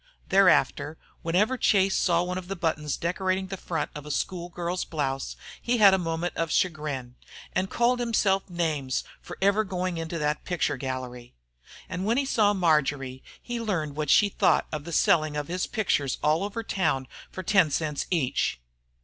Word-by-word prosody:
Thereafter 160 -5 +3 0.2
whenever 205 +10 +1
Chase 195 -2 +3
saw 175 -1 +2
one 180 +1 -3
of 180 - -10
the 195 - -3
buttons 155 -4 -1
decorating 185 +2 -1
the 195 - -3
front 165 -5 -3
of 150 - -7
a 150 - -9
school 175 +4 -2
girl's 175 +1 -3
blouse, 135 -4 -3 0.3
he 240 +1 +1
had 200 -3 +7
a 190 - +3
moment 165 0 -2
of 165 -1 -1
chagrin, 150 -9 -1 0.4
and 190 +1 0
called 245 +1 +2
himself 205 -5 +1
names 155 -7 -1 0.2
for - - -9
ever 200 +2 +4
going 185 -3 -3
into 165 +1 -4
that 150 -1 -1
picture 170 -5 0
gallery. 125 - -6 0.5
And 180 - -4
when 225 +4 +1
he 275 - +1
saw 210 -5 +3
Marjory 145 -7 +1 0.2
he 240 -1 -5
learned 165 -10 -2
what 150 -1 -2
she 205 - +5
thought - - +2
of 150 -2 -4
the 170 - -6
selling 155 -2 +3
of 150 +1 -4
his 180 +1 -1
pictures 180 - 0
all 155 +4 +3
over 210 +3 -4
town 135 -11 0 0.2
for 185 - -7
ten 185 -4 +4
cents 150 0 -2
each. 140 - 0
170 Hz, 175 wpm, -27 LUFS, 150-195 Hz, 0.5 s, had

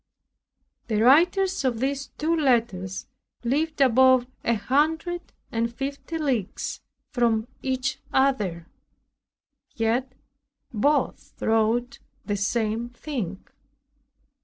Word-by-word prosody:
The 215 -3 0
writers 350 - +4
of 245 -4 0
these 275 +2 -1
two 320 +2 +1
letters 230 - 0 0.4
lived 295 +5 0
above 260 0 +5 0.2
a 235 - +2
hundred 320 - 0 0.2
and 230 0 0
fifty 275 +6 -5
leagues 255 - -2 0.3
from 230 -3 +1
each 260 0 -1
other; 210 -11 +1 1.1
yet 240 +3 0 0.6
both 280 +5 0
wrote 225 +2 +1 0.3
the 205 - -1
same 220 +3 -1
thing. 235 - -5
250 Hz, 90 wpm, -25 LUFS, 225-280 Hz, 1.1 s, above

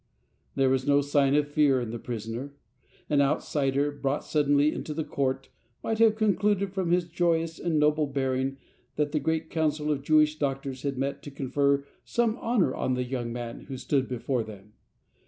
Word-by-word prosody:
There 135 -1 +3
was 130 +1 0
no 145 0 +5
sign 140 -1 +2
of 145 0 +2
fear 145 -3 +3
in 120 -3 -4
the 120 - -5
prisoner. 120 +5 -5 0.5
An 145 -1 +3
outsider, 140 0 +1
brought 145 0 -2
suddenly 145 0 +2
into 150 - -5
the 160 - -1
court, 135 -2 -2 0.3
might 225 -1 -1
have 225 -1 +5
concluded 205 -2 +1
from 190 -3 -1
his 175 0 +2
joyous 165 -1 0
and 170 -3 0
noble 150 0 +3
bearing 135 -1 -1 0.4
that 150 -1 0
the 155 - +1
great 160 +2 -1
council 155 -1 0
of 140 -2 -1
Jewish 155 +1 +3
Doctors 135 -2 -2
had 140 -2 -2
met 135 +2 -2
to - - -8
confer 140 +1 0 0.2
some 235 -2 +1
honour 225 - +1
on 130 - -1
the 125 - -1
young 125 -2 -3
man 120 -1 -6
who 135 - -6
stood 135 0 0
before 125 0 -1
them. 105 -1 -10
145 Hz, 180 wpm, -27 LUFS, 135-155 Hz, 0.5 s, no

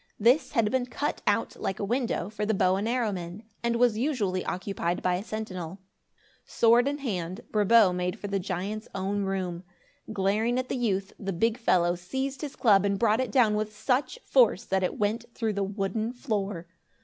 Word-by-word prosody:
This 240 +8 +3
had 215 -2 +2
been 255 -1 0
cut 290 +3 -3
out, - - +1
like 190 - -3
a - - -2
window, 235 -4 -1
for 210 0 -5
the 215 0 +1
bow 185 -1 +3
and 200 +3 -1
arrow 240 -3 +1
men, 180 +2 -6 0.2
and 235 0 0
was 235 -2 +3
usually 215 -10 0
occupied 180 -2 -2
by 180 - +2
a 180 +2 -2
sentinel. 190 -6 -5 0.7
Sword 235 +3 +4
in 285 +1 -1
hand, 190 - -4
Brabo 210 -2 +5
made 180 0 -2
for - - -7
the 200 0 -1
giant's 195 +4 -4
own 195 +1 -1
room. 185 -2 -3 0.5
Glaring 215 +4 +1
at 255 0 -2
the - - -1
youth, 200 -6 -1
the 195 -1 -3
big 225 +6 0
fellow 175 -7 +3
seized 265 +11 -4
his 295 -3 -5
club 210 -7 +4
and 200 -1 +1
brought 225 +2 +3
it 255 -4 -3
down 225 -3 +4
with 215 0 -2
such 265 - 0
force - - +4
that 190 0 0
it 180 - -1
went 215 +3 0
through 225 -3 -1
the 200 - -2
wooden 200 +3 -2
floor. 205 - -3
210 Hz, 195 wpm, -27 LUFS, 190-235 Hz, 0.7 s, Brabo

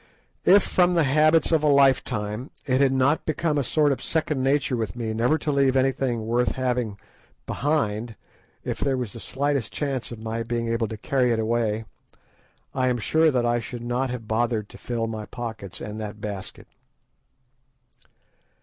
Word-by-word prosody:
If 200 +2 +7
from 180 -1 +2
the 165 - +4
habits 155 +4 +4
of 160 -2 +3
a 150 - +2
lifetime, 130 -4 +2 0.2
it 130 0 +2
had 135 -1 +4
not 135 +3 +2
become 155 -1 0
a - - +1
sort 150 +3 +2
of 135 - -2
second 155 -4 -1
nature 135 -1 +1
with 110 -4 -3
me 115 -2 -3
never 120 +8 +2
to 155 - -2
leave 135 -2 +3
anything 130 -3 +1
worth 120 +2 +1
having 125 -5 -1 0.5
behind 120 -6 -1 0.5
if - - -4
there 135 -2 0
was 120 -6 -4
the 115 - -8
slightest 140 -3 -1
chance 135 -5 -3
of 120 - -6
my 110 +1 -4
being 115 0 -2
able 115 -1 0
to 110 - -6
carry 125 +2 +1
it 115 - +1
away, 110 -1 0 0.9
I 130 -1 +1
am 125 -1 +1
sure 160 +8 +3
that 125 -4 +1
I 120 0 +2
should 120 +1 -7
not 125 +2 -1
have 120 -3 -6
bothered 110 -1 0
to - - -12
fill 115 -2 -2
my 110 -2 -5
pockets 110 -4 -6
and 105 +1 -6
that 105 0 -6
basket. 100 -2 -6
125 Hz, 175 wpm, -25 LUFS, 115-140 Hz, 0.9 s, If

